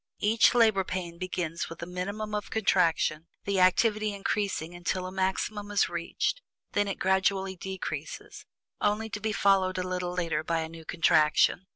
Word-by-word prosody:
Each 225 +3 +4
"labor 220 -5 +4
pain" 175 -2 -5
begins 180 -3 -3
with 165 0 -8
a - - -3
minimum 200 +4 -4
of 210 0 -3
contraction, 170 -6 +1 0.2
the 200 -1 0
activity 215 +3 +3
increasing 195 -4 -2
until 175 +1 -2
a 185 - -5
maximum 190 +2 -2
is 205 -1 +2
reached, 170 - -2 0.3
when 205 0 +2
it 200 - -2
gradually 190 0 +1
decreases, 190 +1 -6 0.3
only 210 +1 +1
to 210 - -4
be 215 +1 -1
followed 195 -2 +2
a 185 0 -2
little 180 -1 -2
later 165 -4 -1
by 165 0 0
a 160 - -4
new 165 -1 -11
contraction. 165 +2 +3
190 Hz, 165 wpm, -28 LUFS, 175-205 Hz, 0.3 s, Each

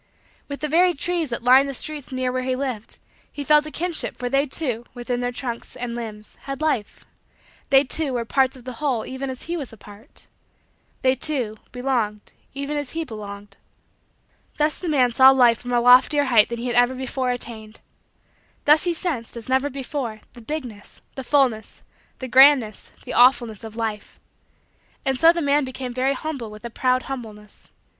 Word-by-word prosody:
With 280 -1 -7
the 305 - -1
very 350 +3 +3
trees 340 0 -1
that 235 -1 -4
lined 260 +3 +6
the 275 - -5
streets 295 0 -4
near 255 -1 -1
where 255 0 -2
he 255 0 -1
lived, 255 -5 -4 0.3
he 290 - -6
felt 300 +2 +4
a - - -5
kinship 345 0 -2
for 245 0 -3
they, 275 +3 +1
too, 255 -5 -2
within 245 0 -3
their 245 0 -1
trunks 240 -1 -6
and 245 -1 -5
limbs, 215 -3 -8
had 275 -1 -5
life 300 -9 -2 0.6
they, 270 0 +6
too, 290 +1 -1
were 235 -1 -2
parts 265 +2 +1
of 255 - -14
the 255 - -6
whole 260 -7 0
even 265 +1 -5
as 260 -1 -6
he 340 - -4
was 285 -7 -5
a 225 - -13
part 210 +6 -15 0.8
they, 260 0 +4
too, 260 -5 -2 0.2
belonged 240 -5 -2 0.2
even 280 +2 -3
as 290 -3 -5
he 330 0 -2
belonged. 205 -4 -9 1.0
Thus 300 0 0
the 355 - -4
man 255 -5 +3
saw 260 +3 +7
Life 245 -3 +5
from 245 - -7
a 240 - +3
loftier 250 +4 +5
height 235 -6 +4
than 235 - -4
he 235 - -5
had 245 - -2
ever 245 +1 +3
before 260 0 -3
attained. 225 -3 -5 0.9
Thus 300 +3 +5
he 350 - +1
sensed, 295 -10 -3
as 230 +1 -4
never 265 +2 +2
before, 265 -5 -5
the 240 - -13
bigness, 240 -6 -7
the 265 - -6
fullness, 250 -6 0 0.3
the 260 - -6
grandness, 260 -4 +5
the - - -5
awfulness, 240 -3 +3
of 220 -1 -9
Life. 220 -2 -5 0.9
And 265 -1 0
so 330 0 +7
the 340 -1 -2
man 285 +1 +2
became 255 -1 -6
very 260 +2 +1
humble 275 -5 -5
with 215 +1 -11
a 235 - -6
proud 255 +2 +1
humbleness. 215 -6 -9
255 Hz, 190 wpm, -22 LUFS, 235-280 Hz, 1.0 s, saw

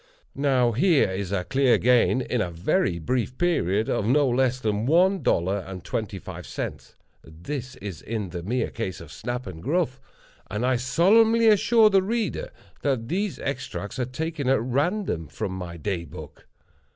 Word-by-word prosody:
Now, 130 -4 +2
here 140 - +3
is 95 0 -4
a 95 -3 0
clear 135 +3 +3
gain, 125 +1 +3
in 125 -2 -1
a 90 - -1
very 85 +1 0
brief 125 +6 -2
period, 110 - +1
of - - 0
no 140 +3 +4
less 130 0 +1
than 110 -1 -1
one 185 +5 +4
dollar 95 +4 +1
and 95 -1 -8
twenty 110 -3 -3
five 90 -5 -9
cents—this 115 - -7
is 95 -6 -7
in 105 -4 -4
the 85 - -5
mere 120 +9 -1
cases 95 -7 -4
of 80 -2 -11
Snap 120 +2 -4
and 90 -4 -8
Gruff; 140 - -1 0.5
and 105 +5 -2
I 130 -1 +2
solemnly 220 - +4
assure 215 +1 +5
the 195 -1 +5
reader 230 - -2 0.3
that 130 -5 -1
these 195 +2 -1
extracts 130 -4 -4
are 125 - +1
taken 145 +2 -3
at 135 - +4
random 135 - -1
from 95 - -4
my 90 -2 -6
Day 85 0 -3
Book. 80 -2 -11
125 Hz, 165 wpm, -25 LUFS, 95-145 Hz, 0.5 s, assure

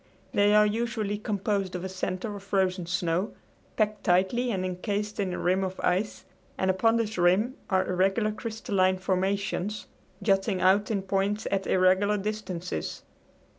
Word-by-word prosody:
They 205 +1 +4
are 210 0 +7
usually 215 -1 -1
composed 200 -3 -1
of 180 - -4
a - - -2
center 185 +2 -4
of 200 - -8
frozen 190 -2 0
snow, 180 +3 -1 0.4
packed 215 -1 0
tightly 195 +7 +2
and 190 -5 -1
incased 205 +3 -3
in 195 -2 0
a - - -3
rim 185 +2 +1
of 185 0 -4
ice, 190 +4 0 0.3
and 190 0 +2
upon 225 +5 +2
this 220 -4 -1
rim 190 +8 +3 0.2
are 190 -1 +2
irregular 195 +4 +1
crystalline 205 -4 0
formations 195 +2 -1 0.4
jutting 195 -1 +2
out 195 +3 +3
in 200 -3 -1
points 195 +2 0
at 195 -1 0
irregular 190 +3 +3
distances. 195 -4 -4
195 Hz, 150 wpm, -27 LUFS, 185-210 Hz, 0.4 s, are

